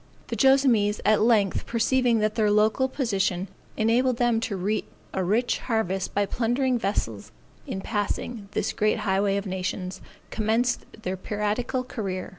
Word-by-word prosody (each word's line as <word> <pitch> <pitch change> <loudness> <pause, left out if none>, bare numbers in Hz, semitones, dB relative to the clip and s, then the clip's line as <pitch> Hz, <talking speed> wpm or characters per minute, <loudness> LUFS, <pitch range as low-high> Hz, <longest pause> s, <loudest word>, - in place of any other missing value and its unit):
The - - -2
Joassamees 260 -7 +4
at 215 0 +4
length 215 -4 +2
perceiving 240 +1 +2
that 215 0 +1
their 215 -2 +2
local 215 +5 +3
position 195 -8 -1 0.3
enabled 235 +3 +2
them 240 -2 +2
to 225 -2 -3
reap 200 +4 -1 0.3
a 190 - 0
rich 220 +7 +1
harvest 195 -5 -2
by 205 0 +2
plundering 245 +4 0
vessels 110 - -2 0.4
in 190 - -4
passing 210 0 -3
this - - -1
great 215 +1 +1
highway 195 0 +2
of 200 - -3
nations, 185 0 -4 0.3
commenced 225 +3 0 0.2
their 185 -1 -2
piratical 210 +6 -2
career. 195 -7 -4
215 Hz, 145 wpm, -26 LUFS, 195-240 Hz, 0.4 s, Joassamees